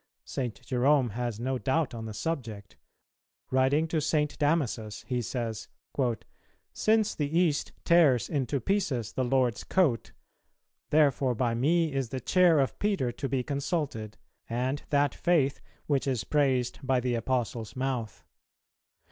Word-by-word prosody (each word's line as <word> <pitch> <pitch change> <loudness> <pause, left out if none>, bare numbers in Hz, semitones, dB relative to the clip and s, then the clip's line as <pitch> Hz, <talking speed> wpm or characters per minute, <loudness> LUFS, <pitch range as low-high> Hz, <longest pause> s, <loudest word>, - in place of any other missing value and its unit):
St. 125 -5 -4
Jerome 130 0 +2
has 120 0 -3
no 130 +1 -1
doubt 140 0 0
on 115 -1 -6
the 110 - -6
subject: 115 -9 -4 0.8
Writing 135 +5 +3
to 160 -1 0
St. 150 0 0
Damasus, 130 -9 0
he 125 -1 -1
says, 115 -2 -4 1.1
"Since 220 -1 +2
the 150 +2 -1
East 165 -5 +1
tears 155 -8 +5
into 140 -2 -1
pieces 135 - -1
the 130 - 0
Lord's 125 -3 +1
coat,... 150 - +1 0.8
therefore 140 -4 +3
by 120 0 0
me 155 +6 +2
is 135 -4 -1
the 130 - -3
chair 175 0 +4
of 135 - 0
Peter 195 -13 0
to 135 +3 -4
be 130 -2 0
consulted, 140 - -3 0.3
and 130 +4 -1
that 145 -2 +2
faith 150 -6 +1 0.2
which 140 -2 0
is 130 -5 0
praised 130 -4 +1
by 130 -2 +1
the 125 0 -1
Apostle's 120 -2 -2
mouth. 130 -5 -3
130 Hz, 140 wpm, -28 LUFS, 120-150 Hz, 1.1 s, tears